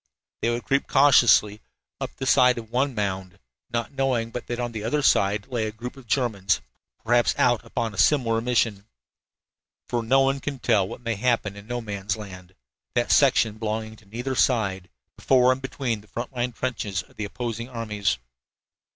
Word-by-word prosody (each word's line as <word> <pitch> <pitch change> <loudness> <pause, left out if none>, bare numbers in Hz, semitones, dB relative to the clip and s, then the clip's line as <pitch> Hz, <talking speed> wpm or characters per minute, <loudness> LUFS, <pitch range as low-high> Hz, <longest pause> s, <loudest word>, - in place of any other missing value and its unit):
They 115 - +1
would 120 +1 -2
creep 135 0 0
cautiously 120 -6 +5 0.4
up - - -3
the 135 - -5
side 125 -1 +5
of 115 -1 -8
one 130 +1 0
mound, 95 -3 -3 0.3
not 115 -1 -2
knowing 130 -4 0
but 120 - -6
that 120 0 -3
on 120 -1 -2
the 110 -2 -5
other 145 +6 0
side 100 -4 +3
lay 120 -4 -2
a - - -4
group 120 +4 -8
of 135 -3 -14
Germans, 105 -7 +1 0.5
perhaps 120 +1 +3
out 120 -4 +3
upon 115 -1 -3
a 100 - -6
similar 115 -6 +3
mission. 115 -4 0 1.0
For 120 - -1
no 130 +4 +3
one 135 +1 +2
can 140 0 -4
tell 100 -6 +2
what 120 - -8
may 115 -1 -1
happen 115 -3 0
in 100 +1 -12
No 120 0 -3
Man's 100 -2 -3
Land 95 -3 -10 0.4
that 120 0 +1
section 115 -6 +4
belonging 110 0 -3
to 105 - -21
neither 120 +6 -4
side, 100 -9 +1 0.3
before 130 -1 +4
and 130 +1 -1
between 130 -5 -3
the 105 - -20
front 120 +5 -6
line 125 0 -1
trenches 110 -7 -3
of - - -24
the 105 - -4
opposing 115 +2 -5
armies. 105 - -1
115 Hz, 185 wpm, -25 LUFS, 105-125 Hz, 1.0 s, cautiously